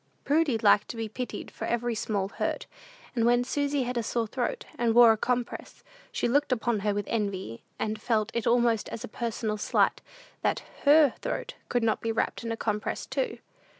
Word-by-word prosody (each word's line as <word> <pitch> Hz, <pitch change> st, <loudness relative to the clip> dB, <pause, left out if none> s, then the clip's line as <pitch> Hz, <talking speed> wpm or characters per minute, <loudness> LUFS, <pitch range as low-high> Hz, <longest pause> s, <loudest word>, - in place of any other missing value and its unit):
Prudy 290 Hz, -4 st, +2 dB
liked 210 Hz, -2 st, +4 dB
to 235 Hz, -, -7 dB
be 225 Hz, -1 st, -2 dB
pitied 245 Hz, +4 st, -6 dB
for -, -, -6 dB
every 240 Hz, 0 st, 0 dB
small 205 Hz, -3 st, -1 dB
hurt; -, -, -2 dB, 0.5 s
and 230 Hz, -, +2 dB
when 240 Hz, +1 st, +4 dB
Susy 285 Hz, +1 st, 0 dB
had 245 Hz, 0 st, -2 dB
a -, -, +1 dB
sore 230 Hz, +1 st, -1 dB
throat, 240 Hz, +3 st, -3 dB
and 230 Hz, -1 st, +1 dB
wore 240 Hz, -1 st, +9 dB
a -, -, +3 dB
compress, 245 Hz, +2 st, -3 dB, 0.3 s
she -, -, 0 dB
looked 280 Hz, +3 st, +2 dB
upon 235 Hz, -2 st, +1 dB
her 205 Hz, +1 st, 0 dB
with 205 Hz, 0 st, -2 dB
envy, 195 Hz, -, -2 dB, 0.2 s
and 215 Hz, 0 st, -2 dB
felt 220 Hz, -1 st, +1 dB
it 235 Hz, -, -1 dB
almost 235 Hz, -2 st, +2 dB
as 225 Hz, -, -6 dB
a -, -, -5 dB
personal 220 Hz, -1 st, -3 dB
slight -, -, +2 dB, 0.4 s
that -, -, 0 dB, 0.2 s
her 290 Hz, -2 st, +7 dB
throat -, -, -4 dB, 0.2 s
could 245 Hz, -1 st, +1 dB
not 220 Hz, -1 st, +1 dB
be 230 Hz, -, -1 dB
wrapped 225 Hz, -, -1 dB
in 230 Hz, -, -3 dB
a 225 Hz, -, -2 dB
compress 210 Hz, -2 st, -2 dB
too. -, -, -2 dB
230 Hz, 195 wpm, -28 LUFS, 215-245 Hz, 0.5 s, wore